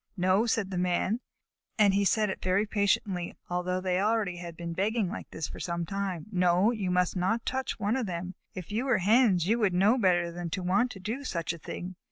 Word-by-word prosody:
"No," 185 +5 +3
said 210 -4 0
the 180 - -1
Man, 180 +5 +1 0.6
and 205 -3 +5
he 200 +1 +3
said 210 0 +2
it - - -7
very 185 +3 +2
patiently, 200 -4 0 0.2
although 180 +1 -1
they 185 -1 0
had 190 - +1
already 180 -6 -1
been 170 -1 -5
begging 200 +2 0
like 225 - -7
this 160 - -4
for - - -9
some 170 -1 -2
time. 195 -3 -3
"No, 180 +3 +3
you 205 -6 -2
must 180 0 +1
not 190 +6 0
touch 265 -1 -2
one 205 +4 +1
of 255 -5 -1
them. 180 +1 -4 0.2
If 185 +1 -7
you 225 +5 -1
were 255 -5 +3
Hens, 200 -2 +4
you 225 +5 +2
would 200 -5 +2
know 210 +8 +4
better 175 -4 +2
than 175 0 -5
to 185 +2 -3
want 200 +8 +2
to 195 - -10
do 225 +9 -4
such 170 -9 -2
a 170 - -10
thing. 180 +3 -7
190 Hz, 225 wpm, -29 LUFS, 180-215 Hz, 0.6 s, and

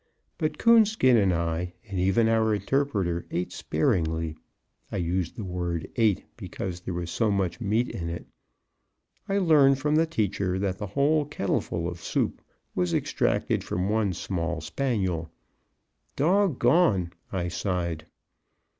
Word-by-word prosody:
But 155 - -1
Coonskin 220 - +5
and 100 -4 +4
I, 85 +1 -1
and 100 -2 -3
even 95 +5 +3
our 110 -1 +3
interpreter, 100 -9 -1
ate 90 +1 -2
sparingly 80 -1 0 0.6
(I - - -2
use 90 -1 -1
the 110 - -6
word 90 -3 -3
"ate," 110 -5 +2
because 90 -2 -5
there 90 0 -5
was 85 -1 -4
so 115 -2 +1
much 95 -3 -1
meat 110 +3 +1
in 85 -2 -4
it). 85 0 -6 1.0
I 195 - +1
learned 150 -7 +5
from 150 +2 0
the 165 +1 +3
teacher 100 - -1
that 95 -1 -2
the 105 - -3
whole 145 +7 +2
kettleful 95 - -2
of 85 -1 -6
soup - - -1 0.3
was 90 -1 0
extracted - - 0
from 90 +2 -2
one 105 -3 +1
small 85 -2 -3
spaniel. 95 - -1 0.9
"Dog 175 0 +2
gone!" 120 - +3 0.2
I 90 -2 -1
sighed. 85 -3 -2
95 Hz, 140 wpm, -27 LUFS, 85-125 Hz, 1.0 s, Coonskin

